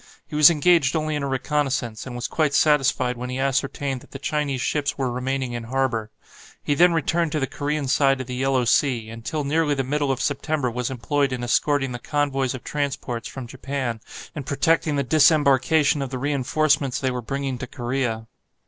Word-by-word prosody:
He -, -, -9 dB
was 150 Hz, +1 st, +8 dB
engaged 165 Hz, -3 st, +3 dB
only 155 Hz, -1 st, -1 dB
in 145 Hz, -, -2 dB
a 140 Hz, -, -2 dB
reconnaissance, 135 Hz, -4 st, -1 dB
and 125 Hz, -, -7 dB
was 120 Hz, -, -3 dB
quite 150 Hz, -3 st, 0 dB
satisfied 135 Hz, -4 st, +2 dB
when 125 Hz, +1 st, -5 dB
he 125 Hz, -, -3 dB
ascertained 135 Hz, 0 st, -1 dB
that -, -, -17 dB
the -, -, -8 dB
Chinese 140 Hz, -1 st, -2 dB
ships 145 Hz, +2 st, -1 dB
were 130 Hz, -3 st, -1 dB
remaining 130 Hz, 0 st, -2 dB
in 120 Hz, -1 st, -5 dB
harbour. 120 Hz, -3 st, -1 dB, 0.5 s
He 145 Hz, -, +1 dB
then 175 Hz, +4 st, +5 dB
returned 165 Hz, 0 st, 0 dB
to 155 Hz, -, 0 dB
the 135 Hz, -, +1 dB
Korean 145 Hz, +1 st, -3 dB
side 135 Hz, 0 st, +3 dB
of 130 Hz, -, -4 dB
the 125 Hz, -, -6 dB
Yellow 130 Hz, 0 st, +1 dB
Sea, 120 Hz, -3 st, +2 dB
and 115 Hz, 0 st, -9 dB
till 155 Hz, +3 st, -2 dB
nearly 150 Hz, +1 st, +1 dB
the 135 Hz, -, -1 dB
middle 145 Hz, +1 st, 0 dB
of 130 Hz, -, -2 dB
September 140 Hz, -2 st, -1 dB
was 125 Hz, +1 st, -2 dB
employed 135 Hz, +2 st, 0 dB
in 125 Hz, -1 st, -3 dB
escorting 135 Hz, +2 st, +1 dB
the 120 Hz, -, -5 dB
convoys 135 Hz, -2 st, -1 dB
of 130 Hz, -, -9 dB
transports 135 Hz, -5 st, -3 dB
from 130 Hz, -2 st, -7 dB
Japan, 130 Hz, -2 st, -4 dB, 0.3 s
and 145 Hz, -4 st, -7 dB
protecting 155 Hz, +2 st, +1 dB
the 140 Hz, -, +1 dB
disembarkation 145 Hz, +1 st, +4 dB
of 135 Hz, -, -3 dB
the 130 Hz, -, -4 dB
reinforcements 140 Hz, 0 st, +1 dB
they 130 Hz, -1 st, 0 dB
were 125 Hz, -1 st, -3 dB
bringing 135 Hz, +1 st, -3 dB
to 125 Hz, -, -5 dB
Korea. 120 Hz, -3 st, -2 dB
135 Hz, 200 wpm, -23 LUFS, 125-145 Hz, 0.5 s, was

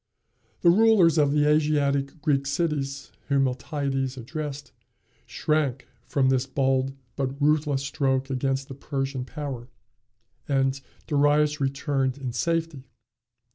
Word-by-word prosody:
The 170 Hz, -, +6 dB
rulers 190 Hz, -6 st, +5 dB
of 145 Hz, -2 st, +3 dB
the 150 Hz, 0 st, +3 dB
Asiatic 145 Hz, -1 st, +1 dB
Greek 140 Hz, -2 st, +1 dB
cities, 140 Hz, -3 st, -2 dB, 0.2 s
whom 140 Hz, -1 st, +3 dB
Miltiades 135 Hz, 0 st, -2 dB
addressed, 145 Hz, +2 st, -6 dB, 0.6 s
shrank 145 Hz, -4 st, -1 dB, 0.2 s
from 135 Hz, -2 st, +2 dB
this 130 Hz, 0 st, +1 dB
bold 135 Hz, 0 st, +1 dB, 0.2 s
but 135 Hz, +1 st, -3 dB
ruthless 145 Hz, -2 st, +2 dB
stroke 135 Hz, -1 st, 0 dB
against 135 Hz, +1 st, -1 dB
the -, -, -8 dB
Persian 135 Hz, -1 st, -3 dB
power, 135 Hz, -4 st, -6 dB, 0.8 s
and 135 Hz, -1 st, +1 dB, 0.2 s
Darius 145 Hz, +1 st, +2 dB
returned 135 Hz, -1 st, 0 dB
in 130 Hz, -4 st, -5 dB
safety. 165 Hz, -3 st, -2 dB
140 Hz, 115 wpm, -25 LUFS, 135-150 Hz, 0.8 s, The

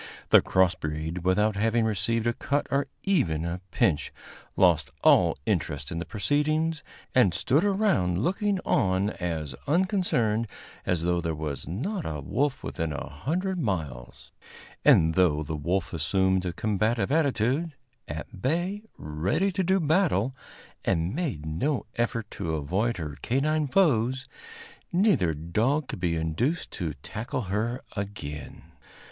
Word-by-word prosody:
The -, -, +8 dB
cross 95 Hz, -1 st, +3 dB
breed, 80 Hz, +1 st, -4 dB
without 105 Hz, +3 st, +2 dB
having 115 Hz, +2 st, +2 dB
received 110 Hz, +2 st, 0 dB
a 120 Hz, -, +2 dB
cut 140 Hz, +4 st, -1 dB
or 140 Hz, 0 st, +1 dB, 0.2 s
even 85 Hz, -, +1 dB
a 85 Hz, +1 st, -3 dB
pinch, 75 Hz, -5 st, +1 dB, 0.5 s
lost -, -, +4 dB
all -, -, +5 dB
interest 75 Hz, +1 st, -1 dB
in 85 Hz, -, -3 dB
the 85 Hz, -, -4 dB
proceedings, 155 Hz, -, 0 dB, 0.3 s
and 100 Hz, -10 st, +4 dB
stood 145 Hz, +5 st, +2 dB
around 190 Hz, -, +2 dB
looking 200 Hz, -, +1 dB
on 95 Hz, 0 st, +2 dB
as 80 Hz, -7 st, -3 dB
unconcerned 145 Hz, -, +1 dB, 0.4 s
as 85 Hz, -2 st, +1 dB
though 90 Hz, 0 st, +1 dB
there 80 Hz, -2 st, -2 dB
was 75 Hz, -3 st, -4 dB
not 160 Hz, -, -3 dB
a 75 Hz, -1 st, -4 dB
wolf 135 Hz, -, -1 dB
within 80 Hz, -3 st, -3 dB
a 70 Hz, -, -4 dB
hundred 180 Hz, -, -2 dB
miles; 80 Hz, -, -4 dB, 0.5 s
and, 80 Hz, 0 st, +6 dB
though 80 Hz, -4 st, +3 dB
the 80 Hz, +2 st, -4 dB
wolf 85 Hz, +7 st, -1 dB
assumed 95 Hz, +3 st, +1 dB
a 90 Hz, -, -2 dB
combative 110 Hz, +5 st, 0 dB
attitude, 145 Hz, +1 st, +1 dB, 0.3 s
at 80 Hz, +5 st, -7 dB
bay, 175 Hz, -, 0 dB, 0.2 s
ready 85 Hz, -, 0 dB
to 190 Hz, +1 st, 0 dB
do 190 Hz, +2 st, +3 dB
battle, 150 Hz, -, +2 dB, 0.5 s
and 85 Hz, +4 st, 0 dB
made 135 Hz, -, -3 dB
no 105 Hz, -, -1 dB
effort 115 Hz, -1 st, -1 dB
to 80 Hz, -1 st, -3 dB
avoid 95 Hz, +11 st, 0 dB
her 75 Hz, -4 st, -6 dB
canine 150 Hz, +4 st, +1 dB
foes, 130 Hz, -, +2 dB, 0.7 s
neither 150 Hz, -, +3 dB
dog 110 Hz, -, 0 dB
could -, -, -5 dB
be 85 Hz, -2 st, 0 dB
induced 80 Hz, -, -1 dB
to 80 Hz, -6 st, -4 dB
tackle 115 Hz, +4 st, -4 dB
her 110 Hz, +6 st, -2 dB
again. 75 Hz, -9 st, -6 dB
105 Hz, 140 wpm, -27 LUFS, -, 0.7 s, The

